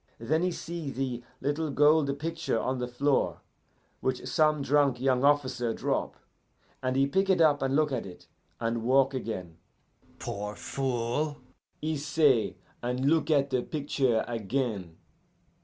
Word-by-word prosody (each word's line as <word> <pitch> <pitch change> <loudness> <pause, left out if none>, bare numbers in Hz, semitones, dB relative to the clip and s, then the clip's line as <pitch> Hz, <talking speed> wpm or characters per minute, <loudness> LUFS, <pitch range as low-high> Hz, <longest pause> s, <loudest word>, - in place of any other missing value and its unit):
Then 155 +8 0
he 180 - +2
see 170 -3 -5
the 130 -2 -3 0.2
little 150 +2 -1
gold 145 0 +3
picture 165 -5 -2
on 130 +2 -1
the 125 - -2
floor 135 +3 0 0.6
which 130 -1 -2
some 155 -2 +2
drunk 140 -3 +3
young 130 0 +2
officer 130 -5 +2
drop, - - -1 0.7
and 130 0 -1
he 135 +1 +4
pick 190 +8 +1
it 185 -2 +4
up 150 -4 +4
and 135 0 +1
look 150 -1 +2
at 120 -6 -2
it, 90 - -12 0.3
and 115 0 -1
walk 135 +3 +3
again. 95 -10 -5 0.6
'Poor 105 +1 -5
fool!' 135 +3 -2 0.5
he 155 0 0
say, 140 - +2 0.3
and 125 +4 0
look 160 -1 +2
at 140 -3 +3
the 130 -1 +2
picture 135 -5 0
again. 110 -6 -2
135 Hz, 145 wpm, -29 LUFS, 120-150 Hz, 0.7 s, he